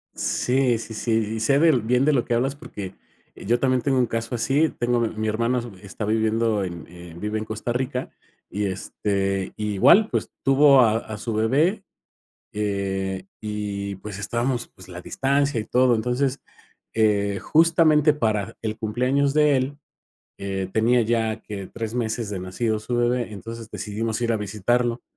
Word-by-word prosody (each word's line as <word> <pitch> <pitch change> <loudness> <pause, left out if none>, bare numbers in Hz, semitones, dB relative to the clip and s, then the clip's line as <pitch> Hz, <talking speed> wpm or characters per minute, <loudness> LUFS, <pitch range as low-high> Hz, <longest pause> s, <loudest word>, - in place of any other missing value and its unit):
Sí, 125 -1 +1
sí, 115 - -8
sí. 115 +2 -3 0.2
Y - - -3
sé 135 +6 +3
del 155 -6 +4
bien 125 +4 +2
de 150 - +4
lo 125 -4 +1
que - - -1
hablas 130 +4 0
porque 100 -10 -8 0.4
yo 120 +4 0
también 130 -1 +2
tengo 135 0 +1
un 125 - +4
caso 115 +2 -3
así. 140 +7 +2
Tengo 120 0 +1
a - - +2
mi 115 - +1
mi 110 0 -2
hermano 115 +3 +1 0.2
está 100 +2 -6
viviendo 110 0 +1
en 85 -2 -6
en 85 -1 -12
vive 105 +2 -2
en 110 - -4
Costa 110 +2 -4
Rica 125 +1 -2 0.4
y 105 +1 -2
este, 95 0 -2
igual, 115 - +4
pues - - -2
tuvo 135 0 +6
a 110 -2 +4
a 110 -1 -6
su 115 +2 -4
bebé, 145 - +2 0.7
eh, 95 -2 -2 0.2
y 105 -2 -4
pues 100 0 -8
estábamos, 120 +4 -1
pues, 95 - -15
la 90 -1 -8
distancia 140 +4 0
y - - -5
todo. 125 +1 +3
Entonces, 125 +4 0 0.5
eh, 100 -2 +2
justamente 155 -2 +4
para 110 -8 -1
el 110 -1 -3
cumpleaños 125 +5 +1
de 150 -2 +4
él, 135 +2 -2 0.6
eh, 95 -1 -3
tenía 120 +2 +3
ya 110 -1 0
que 100 -3 -7
3 115 +1 -6
meses 115 -2 -2
de 100 - -3
nacido 110 +4 -1
su 120 +3 -3
bebé, 120 -1 0
entonces 115 +3 -8
decidimos 110 +2 -3
ir 120 -1 +1
a - - +1
visitarlo. 115 +4 0
115 Hz, 170 wpm, -24 LUFS, 105-125 Hz, 0.7 s, tuvo